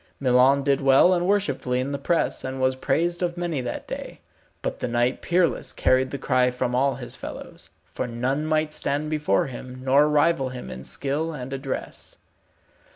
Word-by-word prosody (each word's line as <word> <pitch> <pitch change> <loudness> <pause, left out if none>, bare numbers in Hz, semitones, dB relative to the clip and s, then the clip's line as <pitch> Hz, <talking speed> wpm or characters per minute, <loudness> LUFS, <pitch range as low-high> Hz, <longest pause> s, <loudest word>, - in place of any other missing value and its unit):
Milon 130 +1 +4
did 140 0 +2
well 135 +7 +6
and 175 0 0
worshipfully 140 -11 +1
in 130 +2 -2
the 140 - -3
press, 170 +4 0
and 130 0 -4
was 130 0 +2
praised 165 +7 0
of 175 -1 -1
many 170 -6 -2
that 125 - -5
day. - - -7 0.4
But - - -3
the - - -2
Knight 120 +1 0
Peerless 175 -1 +1
carried 130 0 +2
the 140 - -4
cry 125 -1 +2
from 125 0 -2
all 135 +1 +2
his 120 -1 -6
fellows, - - -9 0.2
for - - -3
none 130 +6 -2
might 155 -1 0
stand 150 +2 -2
before 150 -10 +1
him, 130 0 -8
nor 140 +3 +4
rival 150 -2 +2
him 125 -1 -8
in 65 - -8
skill 150 +4 -2
and 135 -2 -6
address. 135 0 -5
135 Hz, 180 wpm, -24 LUFS, 130-155 Hz, 0.4 s, well